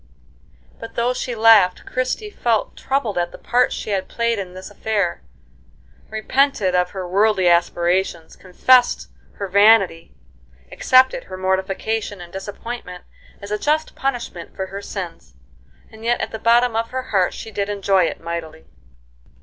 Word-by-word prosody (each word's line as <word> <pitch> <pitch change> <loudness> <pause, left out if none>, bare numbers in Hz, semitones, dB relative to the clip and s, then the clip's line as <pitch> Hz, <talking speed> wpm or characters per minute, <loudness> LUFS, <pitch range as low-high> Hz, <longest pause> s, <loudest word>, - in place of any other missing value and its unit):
But 230 - -9
though 240 +2 +1
she 250 -1 -4
laughed, 220 -5 +5
Christie 255 +12 -3
felt 230 - -1
troubled 255 -9 -1
at 175 0 -1
the - - -10
part 250 +2 +1
she 215 - -4
had 195 -2 -1
played 235 -2 -1
in 185 -2 -7
this 185 +2 -9
affair; 205 -4 -1 0.9
repented 220 -2 +1
of 180 0 +2
her 185 -1 -6
worldly 195 0 +2
aspirations; 175 0 +1
confessed 245 +7 +2 0.2
her 200 - -5
vanity; 195 -3 +4 0.6
accepted 260 0 +3
her 185 - -8
mortification 190 +3 -2
and 175 -1 -11
disappointment 195 -1 -7 0.4
as 200 - -8
a 210 - -1
just 310 +4 0
punishment 245 -10 -4
for 190 - -3
her 195 +1 -7
sins; 185 - -7 0.6
and 220 0 -13
yet 240 +1 +1
at - - -3
the 220 - -6
bottom 235 +1 +3
of 230 0 -1
her 260 0 -5
heart 190 -3 +2
she 220 - -8
did 200 0 -2
enjoy 195 -3 +2
it - - -4
mightily. 165 -1 -6
205 Hz, 150 wpm, -21 LUFS, 185-235 Hz, 0.9 s, laughed